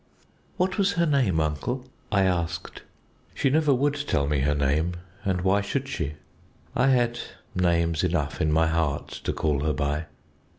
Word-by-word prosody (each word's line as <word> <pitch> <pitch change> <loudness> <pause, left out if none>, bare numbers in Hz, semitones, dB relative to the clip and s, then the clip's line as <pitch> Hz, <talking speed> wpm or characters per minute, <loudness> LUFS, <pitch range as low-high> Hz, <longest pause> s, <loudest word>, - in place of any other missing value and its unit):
"What 185 +1 0
was 200 0 +3
her 170 -3 +2
name, 130 - +2
uncle?" 80 - -2 0.3
I 100 -2 +4
asked. 85 -2 -1 0.5
"She 135 - +2
never 155 0 +3
would 140 +2 +2
tell 70 - +2
me 75 0 +1
her 75 +2 +2
name, 75 +5 +1 0.3
and 95 -2 0
why 95 +2 +3
should 135 +6 -2
she? 80 - -3 0.6
I 125 +2 +3
had 120 -2 +2 0.3
names 85 -2 +1
enough 80 -5 0
in 75 - +2
my 80 +1 +4
heart 80 -3 0 0.2
to - - +1
call 75 -3 0
her 75 +1 0
by. 75 +3 -1
85 Hz, 165 wpm, -26 LUFS, 75-125 Hz, 0.6 s, I